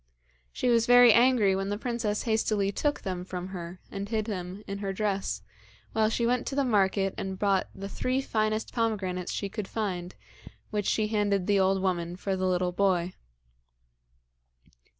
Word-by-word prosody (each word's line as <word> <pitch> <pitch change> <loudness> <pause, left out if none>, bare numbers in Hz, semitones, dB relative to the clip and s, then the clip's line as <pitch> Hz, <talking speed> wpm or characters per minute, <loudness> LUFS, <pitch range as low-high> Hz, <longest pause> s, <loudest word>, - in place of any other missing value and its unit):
She - - -2
was 235 -1 +3
very 245 -2 +8
angry 235 -5 +4
when 195 +1 -2
the 205 - -1
princess 225 -3 -2
hastily 215 -3 +1
took 290 +8 -1
them 180 -2 -4
from 180 0 -6
her 180 -1 -7
and 200 0 -5
hid 220 -2 0
them 190 -1 -5
in 200 0 -5
her 200 -1 -2
dress, 195 0 -2 0.5
while 220 -1 +3
she 235 +1 0
went 245 +1 +1
to 270 - -3
the 280 - +2
market 195 -4 +2
and 190 -1 -4
bought 195 -1 +1
the 195 +1 -6
three 255 +6 -1
finest 215 -4 -1
pomegranates 195 -6 -1
she 200 - -2
could 200 0 -5
find, 185 -5 -3 0.6
which 210 -2 -1
she 215 -1 +1
handed 205 -3 +1
the 200 0 +3
old 190 0 +2
woman 175 -2 -1
for 190 +1 -2
the 185 0 0
little 180 0 +1
boy. 180 -1 +1
200 Hz, 170 wpm, -28 LUFS, 190-220 Hz, 0.6 s, very